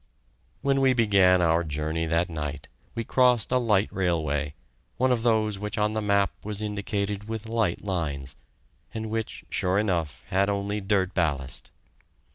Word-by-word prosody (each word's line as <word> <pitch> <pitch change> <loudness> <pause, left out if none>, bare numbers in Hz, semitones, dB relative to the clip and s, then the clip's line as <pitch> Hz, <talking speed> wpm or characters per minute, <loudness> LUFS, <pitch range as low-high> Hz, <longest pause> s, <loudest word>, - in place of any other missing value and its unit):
When 135 0 +2
we 130 -1 +5
began 100 -6 +4
our 85 0 +3
journey 80 +1 -2
that 85 +2 +1
night, 75 -4 -5 0.3
we 115 - -2
crossed 125 -1 +3
a 125 - +4
light 105 -4 +2
railway, 75 -5 0 0.4
one 130 +1 +3
of 120 -2 +2
those 110 -3 +1
which 105 0 -4
on 105 0 +1
the 110 - -1
map 100 -1 +2
was 105 -1 -4
indicated 105 -1 -2
with 110 0 -4
light 110 -6 0
lines, 75 -8 -3 0.6
and 110 -1 -4
which, 110 -1 -4
sure 90 +1 +1
enough, 90 -8 -1
had 100 +2 +3
only 100 +1 -1
dirt 95 -2 +1
ballast. 70 -7 -2
100 Hz, 155 wpm, -26 LUFS, 85-110 Hz, 0.6 s, we